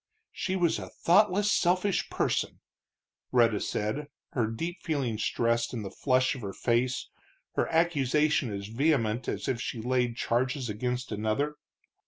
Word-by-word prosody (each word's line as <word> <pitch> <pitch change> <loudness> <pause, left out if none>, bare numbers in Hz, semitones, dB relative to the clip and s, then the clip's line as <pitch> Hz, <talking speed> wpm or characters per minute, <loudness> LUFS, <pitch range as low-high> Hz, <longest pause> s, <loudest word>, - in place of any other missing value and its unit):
"She 190 - -2
was 175 -3 +2
a - - -7
thoughtless, 205 +3 +3
selfish 185 +2 +2
person!" - - -1 0.7
Rhetta 115 -4 +4
said, 125 +8 -2 0.2
her 120 -4 0
deep 165 +11 -4
feeling 135 -9 -1
stressed 115 +2 0
in 110 - -3
the 95 - -6
flush 130 -1 +2
of 135 - -7
her 100 -2 -5
face, 120 +1 0 0.5
her - - +1
accusation 150 -5 +2
as 100 -1 -4
vehement 120 -1 +1
as - - -3
if 120 -2 -1
she 120 - -4
laid 125 0 0
charges 125 +2 0
against 125 +4 -3
another. 110 +8 -1
125 Hz, 145 wpm, -29 LUFS, 115-150 Hz, 0.7 s, Rhetta